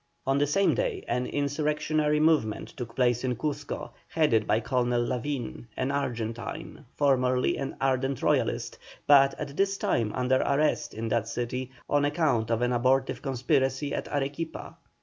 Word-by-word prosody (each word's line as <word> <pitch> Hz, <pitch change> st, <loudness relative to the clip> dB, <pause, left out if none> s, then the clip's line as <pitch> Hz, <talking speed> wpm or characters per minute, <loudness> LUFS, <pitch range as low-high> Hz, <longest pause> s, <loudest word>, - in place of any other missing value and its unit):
On 135 Hz, +1 st, +2 dB
the 145 Hz, -, +2 dB
same 195 Hz, +7 st, +3 dB
day -, -, -2 dB
an 125 Hz, 0 st, -1 dB
insurrectionary 150 Hz, +1 st, 0 dB
movement 150 Hz, -9 st, +2 dB
took 120 Hz, -3 st, -8 dB
place 120 Hz, -1 st, +2 dB
in 125 Hz, -1 st, 0 dB
Cuzco, 145 Hz, +4 st, -4 dB, 0.2 s
headed 130 Hz, -9 st, +2 dB
by 110 Hz, -, +3 dB
Colonel 120 Hz, 0 st, 0 dB
Lavin, 125 Hz, -1 st, -3 dB
an 130 Hz, +1 st, 0 dB
Argentine, 120 Hz, -5 st, -4 dB
formerly 130 Hz, -3 st, +2 dB
an 135 Hz, -, -4 dB
ardent 135 Hz, 0 st, 0 dB
Royalist, -, -, 0 dB, 0.3 s
but 135 Hz, -1 st, +5 dB
at 140 Hz, -, -5 dB
this 195 Hz, +2 st, +1 dB
time 115 Hz, -, 0 dB
under 130 Hz, +1 st, +2 dB
arrest 150 Hz, +2 st, +1 dB
in 115 Hz, +1 st, -3 dB
that 110 Hz, -, 0 dB
city 125 Hz, +2 st, -3 dB, 0.2 s
on 145 Hz, 0 st, +2 dB
account 145 Hz, -7 st, +1 dB
of 115 Hz, +1 st, +1 dB
an 125 Hz, 0 st, +1 dB
abortive 130 Hz, +2 st, +1 dB
conspiracy 135 Hz, +1 st, 0 dB
at -, -, -3 dB
Arequipa. 145 Hz, +3 st, -4 dB
135 Hz, 150 wpm, -28 LUFS, 120-145 Hz, 0.3 s, but